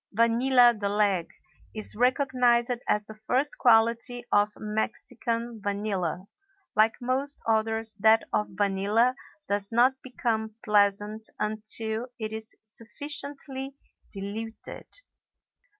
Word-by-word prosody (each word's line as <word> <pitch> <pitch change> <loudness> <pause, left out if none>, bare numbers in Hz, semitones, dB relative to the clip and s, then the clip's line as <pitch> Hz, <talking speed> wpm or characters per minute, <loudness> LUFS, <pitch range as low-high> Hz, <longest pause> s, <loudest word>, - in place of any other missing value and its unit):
"Vanilla 240 +3 +4
de 205 -2 -3
Leg" 200 -4 +1 0.5
is 215 -1 -3
recognized 250 -1 +2
as 210 0 +1
the 215 - -9
first 250 +7 -1
quality 235 +1 +3
of 205 0 +4
Mexican 230 +2 -3
vanilla. 200 -4 -2 0.5
Like 220 +2 +4
most 265 +3 +1
odors, 225 0 0
that 220 +2 +5
of 210 - +1
vanilla 205 +5 +1 0.3
does 200 +1 -1
not 255 +3 +3
become 220 -4 -3
pleasant 210 +1 +1
until 220 +2 +2
it 220 -2 -4
is 220 0 -4
sufficiently 275 +4 -4 0.4
diluted. 215 +3 -6
220 Hz, 105 wpm, -27 LUFS, 210-245 Hz, 0.5 s, that